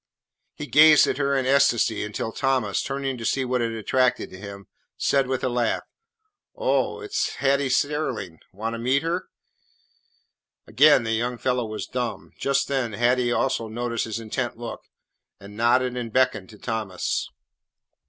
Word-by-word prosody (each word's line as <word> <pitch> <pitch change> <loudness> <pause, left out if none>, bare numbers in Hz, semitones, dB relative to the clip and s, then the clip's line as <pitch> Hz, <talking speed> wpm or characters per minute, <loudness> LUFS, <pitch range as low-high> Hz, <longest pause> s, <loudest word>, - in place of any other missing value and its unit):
He 150 - -6
gazed 150 +1 +7
at - - -2
her 140 -1 +1
in 130 - 0
ecstasy 120 -5 +3
until 105 +1 -4
Thomas, 130 -5 0
turning 135 -2 -3
to - - -6
see 130 +3 0
what 125 -1 0
had 115 -1 -1
attracted 125 +3 0
him, 100 +1 -9 0.3
said 135 -2 +2
with 130 -1 -2
a - - +2
laugh, 120 -2 0 0.7
"Oh, - - 0
it 415 -1 -9
's - - 0
Hattie 140 0 +1
Sterling. 130 - -1
Want 110 +4 -4
to 115 - -5
meet 130 +5 +1
her?" 170 +3 -2 1.4
Again 140 +3 +5
the 115 - -2
young 120 +2 -1
fellow 125 -1 -1
was 110 0 -5
dumb. 120 -3 -4
Just 140 0 +1
then 130 -5 -1
Hattie 120 +2 +2
also 120 -2 0
noticed 115 +1 -2
his 115 0 -4
intent 115 +1 -3
look, 115 -1 -7 0.6
and 100 +1 -12
nodded 120 +2 +2
and 120 -2 -4
beckoned 125 -6 +1
to 110 - -13
Thomas. 110 -4 -3
125 Hz, 160 wpm, -24 LUFS, 115-135 Hz, 1.4 s, gazed